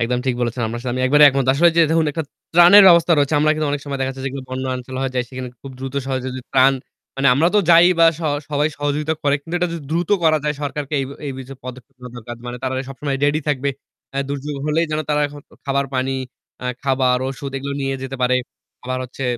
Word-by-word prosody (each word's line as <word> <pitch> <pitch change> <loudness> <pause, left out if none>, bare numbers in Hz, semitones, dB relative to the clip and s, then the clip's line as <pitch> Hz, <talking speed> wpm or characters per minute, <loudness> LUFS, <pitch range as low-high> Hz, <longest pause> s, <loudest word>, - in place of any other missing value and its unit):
একদম 120 +1 0
ঠিক 130 - +1
বলেছেন। 120 +1 -2
আপনার 120 +1 -5
সাথে 125 - -3
আমি 130 - -1
একবারে 150 +2 +6
একমত। 135 -1 0
আসলে 170 +5 +5
যে 170 - +6
ধরুন 160 -1 +2
একটা 160 +2 -2 0.3
ত্রাণের 175 +4 +8
ব্যবস্থা 170 -1 +5
রয়েছে 145 +1 +2
আমরা 155 - +3
কিন্তু 155 0 -1
অনেক 145 0 -2
সময় 140 -1 -4
দেখা 130 0 0
যাচ্ছে 135 0 -8
যেগুলো 135 0 -5
যেগুলো - - -13
বন্যা 130 +1 -3
অঞ্চল 125 +1 -9
হয়ে 135 -1 -2
যায় 125 - 0
সেখানে 130 -1 -6
খুব 135 - -8
দ্রুত 135 +1 -6
সহযোগি 130 -1 -3
ত্রাণ 135 0 +5 0.4
মানে 135 +1 +3
আমরা 160 +6 +3
তো - - +6
যাইই 170 +2 +7
বা 165 - +8
স - - -10 0.3
সবাই 150 +1 +1
সহযোগিতা 145 +2 -1
করে। 140 -1 +2
কিন্তু 165 +3 -7
এটা 180 0 0
যদি 170 -2 -6
দ্রুত 170 +1 -1 0.2
করা 155 -1 +4
যায় 150 0 0
সরকারকে 145 0 -4
এ - - -2 0.2
এই 140 - -3
বিষয়ে 130 -1 -9 0.2
পদক্ষেপ 130 +1 -10
নেওয়া 125 -1 -10
দরকার। 120 0 -8
মানে 120 0 -5
তারা 130 0 -2
সবসময় 135 +1 -3
রেডি 145 +2 +2
থাকব। 140 -2 -1 0.5
অ্যা 135 - -1
দুর্যোগ 145 +1 -4
হলেই 160 +2 +1
যেন 155 0 -1
তারা 150 0 +2
এখন 145 0 -11 0.3
খাবার 140 0 0
পানি 130 +1 0 0.5
আ - - -1 0.2
খাবার, 130 -2 +2
ওষুধ 135 +1 -6
এগুলো 140 +1 -5
নিয়ে 135 0 -1
যেতে 135 0 -5
পারে। 125 0 +3 0.5
আবার 130 0 -2
হচ্ছে 130 +2 -7
140 Hz, 235 wpm, -20 LUFS, 130-150 Hz, 0.5 s, ত্রাণের